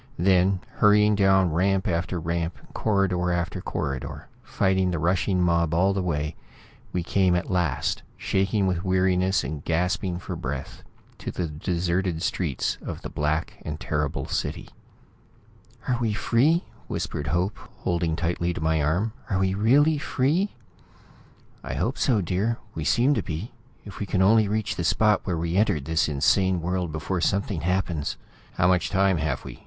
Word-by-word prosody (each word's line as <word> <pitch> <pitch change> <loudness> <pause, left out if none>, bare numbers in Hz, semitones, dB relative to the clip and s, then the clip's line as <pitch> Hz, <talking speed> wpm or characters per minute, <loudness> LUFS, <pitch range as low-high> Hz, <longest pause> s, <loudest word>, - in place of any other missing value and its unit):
Then, 95 +1 +3 0.2
hurrying 105 0 +5
down 95 -4 +3
ramp 95 +3 +1
after 85 +1 -1
ramp, 85 0 -2 0.2
corridor 95 -4 +1
after 85 -1 -2
corridor, 70 -2 -4
fighting 95 -1 +1
the 90 - -1
rushing 90 +3 +1
mob 85 -2 +2
all 95 +3 +3
the 95 - -1
way, 75 -3 -2 0.6
we 90 - -1
came 95 0 +2
at 90 - -2
last, 85 -8 0 0.2
shaking 95 +1 +1
with 90 -2 0
weariness 95 0 +2
and 75 +2 -5
gasping 90 +2 0
for 90 - -6
breath, 65 0 -5 0.4
to - - -5
the 90 - -2
deserted 85 +2 -1
streets 80 -10 -1
of - - -6
this - - -6
black 75 +2 -2
and 75 0 -5
terrible 75 -1 -2
city. - - -3 1.2
"Are 125 -2 +1
we 110 -3 +1
free?" 140 - +2 0.2
whispered 75 - -3
Hope, 90 +4 0 0.3
holding 85 -2 0
tightly 85 +1 -1
to - - -4
my 80 0 +1
arm. 90 +10 0 0.2
"Are 95 - +1
we 95 0 +1
really 140 +9 +4
free?" 155 +7 0 1.1
"I - - -4
hope 125 +4 -1
so, 115 -6 +2
dear. 95 +6 0 0.2
We 80 - -4
seem 125 - +3
to - - 0
be. 85 +7 -5 0.3
If 100 - -9
we 105 - -3
can 95 -1 +2
only 110 +2 +5
reach 105 0 -1
the 85 - -1
spot 105 +5 +3
where 90 -4 -1
we 85 +2 -1
entered 80 -9 +2
this 80 -1 +1
insane 90 +6 +2
world 90 0 -2
before 80 +4 -2
something 100 -1 0
happens 85 -3 -1 0.2
" - - -27
"How 90 - +4
much 90 -1 +2
time 95 -2 +2
have 75 -3 -2
we?" - - -9
90 Hz, 165 wpm, -25 LUFS, 85-100 Hz, 1.2 s, hurrying